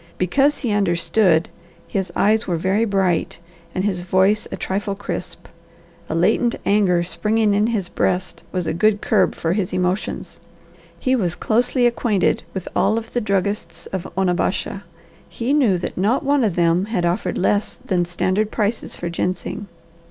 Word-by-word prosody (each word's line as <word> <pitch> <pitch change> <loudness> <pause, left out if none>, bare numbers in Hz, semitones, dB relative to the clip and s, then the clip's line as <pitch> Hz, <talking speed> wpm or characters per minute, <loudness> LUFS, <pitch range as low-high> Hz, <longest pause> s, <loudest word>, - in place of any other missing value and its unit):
Because 275 - +2
he 240 -6 -2
understood, 180 -2 +2 0.4
his 190 -2 -2
eyes 220 +2 +2
were 175 -3 0
very 190 +6 +1
bright, 190 -5 0 0.4
and 185 - 0
his 195 -3 0
voice 190 +4 +2
a - - -4
trifle 200 +1 -2
crisp. 205 - -6 0.6
A - - -1
latent 215 +7 +2
anger 190 -4 +3
springing 210 +4 +1
in 210 +2 +2
his 215 -6 -1
breast 185 +1 -1
was 180 -2 -2
a - - -1
good 205 +4 +2
curb 205 -3 +2
for 165 +1 -1
his 190 -3 -1
emotions. 180 0 -2 0.6
He 260 +6 +2
was 180 -8 0
closely 245 +2 +1
acquainted 235 -5 +1
with 190 0 -6
all 220 - +2
of 230 0 -6
the 245 - 0
druggists 195 -4 -2
of 190 -2 -4
Onabasha, 185 0 0
and 195 - -7 0.5
he 245 +4 -1
knew 245 -11 +3
that 175 - -5
not 220 - +1
one 280 -1 +2
of 205 -6 +1
them 170 +2 +2
had 210 -5 -1
offered 175 +1 -1
less 205 +2 +1
than 175 -2 +1
standard 185 +4 0
prices 215 +1 -2
for 175 - -5
ginseng. 180 +4 -3
195 Hz, 165 wpm, -21 LUFS, 180-215 Hz, 0.6 s, anger